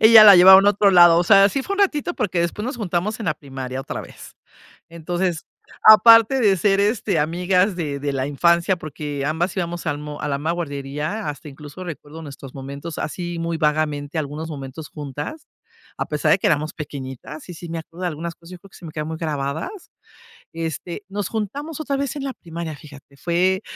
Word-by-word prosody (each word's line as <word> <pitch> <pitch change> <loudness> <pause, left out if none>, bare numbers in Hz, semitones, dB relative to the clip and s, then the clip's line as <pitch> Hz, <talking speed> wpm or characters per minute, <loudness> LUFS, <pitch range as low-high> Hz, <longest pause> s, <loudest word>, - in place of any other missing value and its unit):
Ella 220 0 +9
la 200 -2 +10
llevaron 190 +2 +9
a 205 - +7
otro 205 0 +3
lado. 175 -2 +7
O 175 - +2
sea, 195 +2 +7
así 265 +7 +1
fue 400 - -3
un 400 - -2
ratito, 350 -3 +1
porque 180 -4 -1
después 170 +5 -2
nos 255 +1 -4
juntamos 205 0 -2
en 215 - -4
la 155 - +1
primaria 135 -3 -6
otra 135 - -6
vez. - - -13 0.5
Entonces, 175 +1 -3 0.4
aparte 230 +3 +8
de 205 -5 +3
ser 195 +1 +2
este, 210 0 +1
amigas 180 +5 +1
de 150 -5 -3
de 140 0 -2
la 130 -1 -1
infancia, 170 +5 +2
porque 145 -3 -5
ambas 165 +7 -1
íbamos 175 -2 -3
al 145 -3 -1
mo 150 0 -8
a - - -2
la 140 -1 -1
misma 155 +4 -2
guardería, 150 +2 -4
hasta 150 +2 -8
incluso 145 +5 -10
recuerdo 160 -2 -9
nuestros 140 -3 -10
momentos, 140 +4 -7
así 175 +2 -4
muy 165 0 -2
vagamente, 150 -1 -1
algunos 155 +2 -4
momentos 145 +1 -8
juntas, 150 - -7 0.5
a - - -2
pesar 150 0 0
de - - +5
que - - +1
éramos 155 0 0
pequeñitas 140 0 -8
y - - -6
sí 170 0 -9
me 165 - -4
acuerdo 165 +2 -12
de 180 - 0
algunas 170 +1 -5
cosas. 170 +2 -16
Yo 180 - -10
creo 195 - -17
que - - -16
se 180 - -12
me 160 - -8
quedaron 155 0 -5
muy 160 - -5
grabadas. 155 - -4 0.6
Este, 165 +3 -5
nos 200 -1 -3
juntamos 280 - -5
otra 280 -2 -2
vez 280 +1 -3
en 280 - -4
la 270 - -3
primaria, 165 -2 -7
fíjate. 140 -1 -15
Fue 180 +6 0
170 Hz, 205 wpm, -21 LUFS, 150-195 Hz, 0.6 s, la